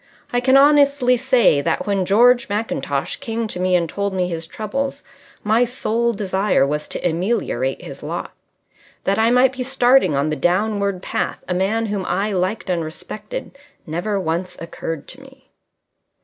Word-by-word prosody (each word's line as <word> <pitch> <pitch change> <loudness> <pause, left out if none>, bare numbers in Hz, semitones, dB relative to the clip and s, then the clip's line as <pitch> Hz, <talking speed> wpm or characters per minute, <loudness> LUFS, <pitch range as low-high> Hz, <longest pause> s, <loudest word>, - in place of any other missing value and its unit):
I 245 - +3
can 260 +2 +4
honestly 280 -3 +5
say 245 - +3
that, - - -1
when 195 -2 0
George 240 +3 +4
Mackintosh 205 -9 -2
came 230 -4 -3
to 180 - -6
me 185 0 +2
and 170 -2 +1
told 200 +3 -3
me 180 -1 0
his 165 -2 -5
troubles, 270 - -4 0.4
my 220 +3 +3
sole 235 -1 0
desire 195 -5 +1
was 150 +2 -2
to - - -2
ameliorate 220 - -1
his - - -9
lot. - - -5 0.7
That 195 +2 +1
I 225 +1 +4
might 250 +2 +4
be 255 - -5
starting 255 - +3
on 140 +3 0
the - - 0
downward 200 +1 0
path - - -3
a 180 - -1
man 200 +5 0
whom 205 -3 -2
I 205 +3 0
liked 185 +4 -1
and 175 -3 0
respected 215 - -7 0.3
never 175 +6 -2
once 180 +1 -3
occurred 165 -2 -6
to 265 - -8
me. 270 0 -18
210 Hz, 165 wpm, -20 LUFS, 180-245 Hz, 0.7 s, honestly